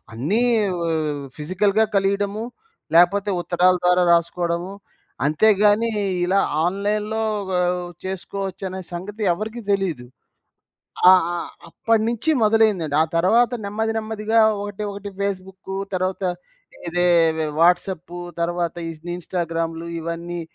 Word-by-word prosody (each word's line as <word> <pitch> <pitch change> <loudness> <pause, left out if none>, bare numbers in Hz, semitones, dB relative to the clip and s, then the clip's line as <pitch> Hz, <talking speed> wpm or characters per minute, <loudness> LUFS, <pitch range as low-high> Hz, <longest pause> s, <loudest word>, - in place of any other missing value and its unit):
అన్నీ 160 - 0 0.4
వ - - -2
వ 150 -4 -2
ఫిజికల్‌గా 195 +7 +1
కలియడము. 200 +2 0 0.5
లేపోతే 195 +4 +4
ఉత్తరాల 180 +1 +3
ద్వారా 180 0 +4
రాసుకోడము. 170 +2 0 0.5
అంతేగానీ, 210 +6 +3 0.3
ఇలా 195 +2 +2 0.2
ఆన్‌లైన్‌లో 210 +4 -1 0.3
గ - - -2 0.5
చేసుకోవచ్చనే 190 0 -5
సంగతి 205 +5 -6
ఎవ్వరికీ 215 +6 -5
దెలీదు. 180 -11 -1 1.0
ఆహ్, 185 -3 +6
ఆహ్, 170 - -5 0.2
అప్పటినుంచి 230 +5 0
మొదలైందండి. 210 -9 +3
ఆ - - +3
తర్వాత 225 +8 +4
నెమ్మది 220 +2 -2
నెమ్మదిగా 220 0 0 0.2
ఒకటి 205 0 -5
ఒకటి 200 0 -7
ఫేస్‌బుక్కు. 190 -1 -4 0.2
తర్వాత 185 +1 -2 0.7
ఇదే 175 +1 +1 0.3
వె 155 - 0
వాట్సాపు. 175 0 +1 0.2
తర్వాత 170 0 -1 0.2
ఇన్ 165 +2 -7
ఇన్‌స్టా‌గ్రామ్‌లు 165 -1 -3
ఇవన్నీ 170 +1 -5
190 Hz, 105 wpm, -22 LUFS, 170-210 Hz, 1.0 s, ఆహ్